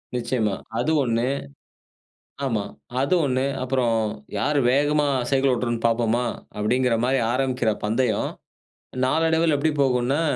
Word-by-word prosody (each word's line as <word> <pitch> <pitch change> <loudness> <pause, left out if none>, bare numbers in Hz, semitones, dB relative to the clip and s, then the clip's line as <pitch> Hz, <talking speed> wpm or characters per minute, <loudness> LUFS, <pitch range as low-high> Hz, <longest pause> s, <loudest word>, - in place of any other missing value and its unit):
நிச்சயமா 115 -4 0 0.2
அது 150 +6 +1
ஒண்ணு. 115 0 0 1.2
ஆமா 110 -6 0 0.4
அது 140 +7 +1
ஒண்ணு, 130 -1 0 0.2
அப்புறம் 125 -3 +1 0.4
யார் 150 0 +1
வேகமா 145 +2 +2 0.2
சைக்கிள் 135 -1 +3
ஓட்டுறோம்னு 120 -1 -2
பார்ப்போமா? 115 +1 +1 0.3
அப்படின்கிற 120 +4 +1
மாதிரி 130 +1 +2
ஆரம்பிக்கிற 125 -4 +1
பந்தயம், 115 +3 0 0.8
நாளடைவில 160 +2 +2
எப்படி 155 +3 +1
போகும்னா 130 +2 +1
130 Hz, 110 wpm, -23 LUFS, 120-140 Hz, 1.2 s, சைக்கிள்